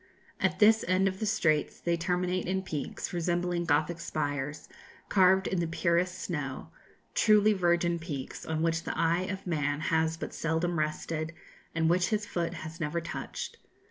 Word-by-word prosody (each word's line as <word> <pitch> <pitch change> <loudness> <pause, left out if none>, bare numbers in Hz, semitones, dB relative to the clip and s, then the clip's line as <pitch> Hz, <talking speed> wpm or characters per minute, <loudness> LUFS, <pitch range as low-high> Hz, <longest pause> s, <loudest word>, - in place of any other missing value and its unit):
At - - +1
this 220 +1 +6
end 185 +1 +3
of 190 0 -2
the 215 - -1
Straits 155 -8 +1
they 170 0 +1
terminate 180 +2 -1
in 190 +1 0
peaks, 150 -2 -4
resembling 175 0 0
Gothic 155 +2 +1
spires, 145 -2 -3 0.4
carved 190 0 +5
in 185 - 0
the 170 - 0
purest 170 +2 +1
snow; 145 -8 -4 0.4
truly 215 -1 +5
'virgin 175 -2 +2
peaks,' 145 -6 -6
on 160 0 -2
which 165 0 +1
the - - -4
eye 170 +3 +2
of 195 -1 -5
man 145 -4 0
has 160 +1 +1
but - - -6
seldom 165 +1 0
rested, 155 +1 -2 0.4
and 165 -1 +2
which 175 +2 +3
his 215 -2 0
foot 170 -2 -2
has 160 +1 -8
never 160 +1 -1
touched. 170 +1 -6
170 Hz, 165 wpm, -30 LUFS, 160-185 Hz, 0.4 s, this